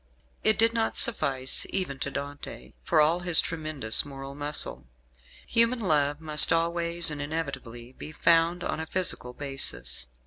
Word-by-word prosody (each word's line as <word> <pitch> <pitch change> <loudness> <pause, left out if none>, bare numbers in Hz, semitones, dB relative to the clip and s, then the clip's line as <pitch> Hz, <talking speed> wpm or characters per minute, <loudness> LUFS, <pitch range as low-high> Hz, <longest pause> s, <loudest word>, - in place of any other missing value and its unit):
It 215 - +3
did 230 +1 +3
not 225 -1 -2
suffice 135 - +1
even 180 -8 -4
to 140 - -4
Dante, 145 +1 -9
for 160 - 0
all 160 +3 +3
his 175 -2 +5
tremendous 155 -8 +1
moral 135 -1 -10
muscle. 145 - 0 0.6
Human 230 +1 +2
love 145 -7 0
must 155 -1 +6
always 170 0 0
and 145 -1 -6
inevitably 135 -6 -7
be 150 - -10
founded 165 +2 +1
on - - -4
a 160 - -6
physical 180 -9 -2
basis. 135 - -4
155 Hz, 145 wpm, -26 LUFS, 140-170 Hz, 0.6 s, must